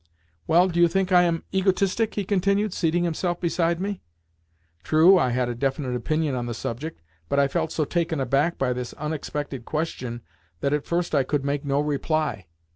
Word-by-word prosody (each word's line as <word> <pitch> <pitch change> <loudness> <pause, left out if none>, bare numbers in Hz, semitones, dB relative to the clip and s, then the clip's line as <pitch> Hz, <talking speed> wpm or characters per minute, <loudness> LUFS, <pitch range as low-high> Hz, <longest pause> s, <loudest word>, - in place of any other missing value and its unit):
"Well, 175 +3 +5
do 175 -2 -2
you 170 - +7
think 190 +2 0
I 180 -1 +7
am 170 -2 +1
egotistic?" 195 +3 +1
he 205 - -1
continued, 200 +1 +1
seating 170 +1 +1
himself 175 +1 -1
beside 170 -1 0
me. 200 0 -3 0.8
True, 165 - +5
I 130 - +2
had 125 0 0
a 120 - -2
definite 130 +1 -2
opinion 155 +4 -1
on 120 -1 -2
the 120 - -4
subject, 120 - -5 0.3
but 140 - 0
I 140 - +4
felt 160 +2 -1
so 155 - 0
taken 165 0 -1
aback 140 +5 +1
by 125 -2 0
this 125 -1 -5
unexpected 145 -3 -4
question 125 -6 -4 0.4
that 140 - +1
at 150 -1 -1
first 170 0 -1
I 140 - +4
could 140 +1 -1
make 140 0 -1
no 140 0 +1
reply. 150 - -1
155 Hz, 190 wpm, -25 LUFS, 135-175 Hz, 0.8 s, you